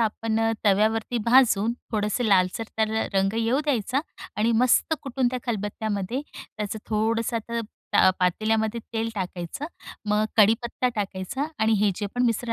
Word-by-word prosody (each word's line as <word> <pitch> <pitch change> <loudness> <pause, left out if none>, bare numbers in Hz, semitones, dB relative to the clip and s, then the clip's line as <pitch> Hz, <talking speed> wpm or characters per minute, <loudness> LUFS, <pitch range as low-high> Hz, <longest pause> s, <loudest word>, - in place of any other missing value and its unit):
आपण 225 0 0 0.2
तव्यावरती 220 +4 +2
भाजून, 230 -2 +4 0.2
थोडंसं 210 +3 0
लालसर 195 +2 +2
तर 220 0 +2 0.2
रंग 195 +1 +2
येऊ 235 +5 +1
द्यायचा 260 -1 0 0.4
आणि 225 +2 +2
मस्त 255 +5 +3
कुटून 260 -2 0
त्या 255 - -2
खलबत्त्यामध्ये 210 +1 -2 0.2
त्याचं 210 0 -6
थोडंसं, 225 +2 0
तर 235 0 -1 0.4
अ, 185 - +7
पातेल्यामध्ये 220 +5 +1
तेल 225 0 -1
टाकायचं, 180 - -4 0.4
मग 210 +1 +3
कडीपत्ता 230 +3 +3
टाकायचा 200 +6 -3 0.2
आणि 220 +1 +3
हे 210 -1 +4
जे 205 - -2
पण 245 - +1
मिश्रण 230 0 -1
220 Hz, 140 wpm, -25 LUFS, 205-235 Hz, 0.4 s, अ